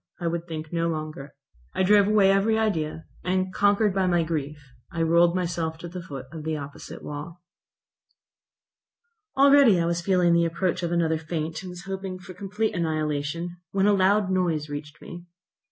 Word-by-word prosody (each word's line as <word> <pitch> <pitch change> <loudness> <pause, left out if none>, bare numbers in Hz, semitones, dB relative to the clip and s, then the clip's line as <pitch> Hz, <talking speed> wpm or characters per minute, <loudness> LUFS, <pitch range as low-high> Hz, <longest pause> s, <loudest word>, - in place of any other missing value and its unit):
I 175 - -5
would 170 0 -2
think 155 -1 -6
no 165 0 +1
longer. 155 -3 -6 0.4
I - - +2
drove 200 +1 +5
away 205 -2 +5
every 205 +3 +2
idea, 160 -8 -1 0.2
and, 185 +1 -1
conquered 205 0 +3
by 190 -1 +1
my 175 -2 +2
grief, 155 -2 -3 0.3
I 165 -1 -1
rolled 170 +1 +4
myself 170 -3 -2
to 175 - -8
the 180 +1 -7
foot 140 -6 -8
of 160 -2 -8
the 155 0 -2
opposite 140 -1 -9
wall. 165 +4 -8 1.9
Already 275 -8 +6
I 170 - +1
was 170 0 0
feeling 180 -1 +3
the 170 0 +4
approach 170 +2 -1
of 170 -1 -2
another 165 -2 +1
faint, 160 0 -4
and 185 - -8
was 180 0 -9
hoping 190 -1 -5
for 185 0 -11
complete 200 +4 -2
annihilation, 155 +1 -2 0.2
when 195 0 +2
a 205 - +5
loud 195 0 +3
noise 165 -5 0
reached 145 0 -7
me. 175 0 -10
170 Hz, 175 wpm, -25 LUFS, 160-190 Hz, 1.9 s, Already